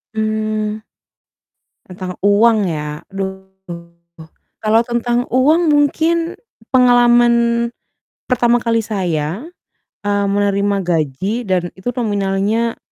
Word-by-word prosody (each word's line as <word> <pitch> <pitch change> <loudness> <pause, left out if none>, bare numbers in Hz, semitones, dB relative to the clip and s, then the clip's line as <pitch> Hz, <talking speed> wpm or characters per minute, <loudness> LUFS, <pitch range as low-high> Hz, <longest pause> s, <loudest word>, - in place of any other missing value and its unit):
Mmm, 215 0 -2 1.1
tentang 185 0 -7
uang 210 +1 +4
ya, 150 -1 -4
aduh 190 0 -6 1.2
kalau 220 +1 +4
tentang 240 +1 -1
uang 305 +7 +3
mungkin 325 +4 +1 0.4
pengalaman 240 -1 +5 0.9
pertama 240 -1 +2
kali 230 -1 +1
saya, 180 - -2 0.6
eee, 205 0 +1
menerima 200 0 +1
gaji 175 - -1
dan 185 -2 +1
itu 190 +5 -5
nominalnya 210 +1 0
215 Hz, 90 wpm, -17 LUFS, 195-240 Hz, 1.2 s, pengalaman